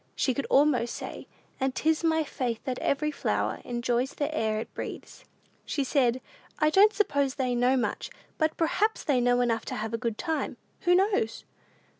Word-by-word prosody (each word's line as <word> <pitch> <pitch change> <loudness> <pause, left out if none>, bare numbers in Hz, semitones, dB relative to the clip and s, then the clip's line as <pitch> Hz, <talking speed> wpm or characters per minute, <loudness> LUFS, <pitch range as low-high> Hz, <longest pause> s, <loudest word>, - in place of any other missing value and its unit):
She 260 - +1
could 275 - -3
almost 270 -4 +3
say, - - -7 0.3
"And 265 0 0
'tis 320 +1 +1
my 320 -1 +2
faith 245 -5 -3
that 255 -2 -3
every 300 +2 0
flower - - -1
Enjoys 240 +2 -1
the 295 +1 -2
air 220 -5 0
it 220 - -7
breathes." - - -8 0.4
She 285 - -1
said, 255 -2 +1 0.4
"I 305 0 +3
don't 405 +5 +6
suppose 285 -10 +1
they 255 -2 0
know 250 +2 +3
much, 245 - -2 0.3
but 315 -1 +1
perhaps 415 +7 +1
they 265 -4 +2
know 245 0 +3
enough 230 -2 +1
to - - -4
have 220 +1 -4
a 230 - -1
good 230 -3 -2
time: 320 -2 -2 0.3
who 355 0 +5
knows?" 375 - +1
265 Hz, 180 wpm, -28 LUFS, 240-310 Hz, 0.4 s, don't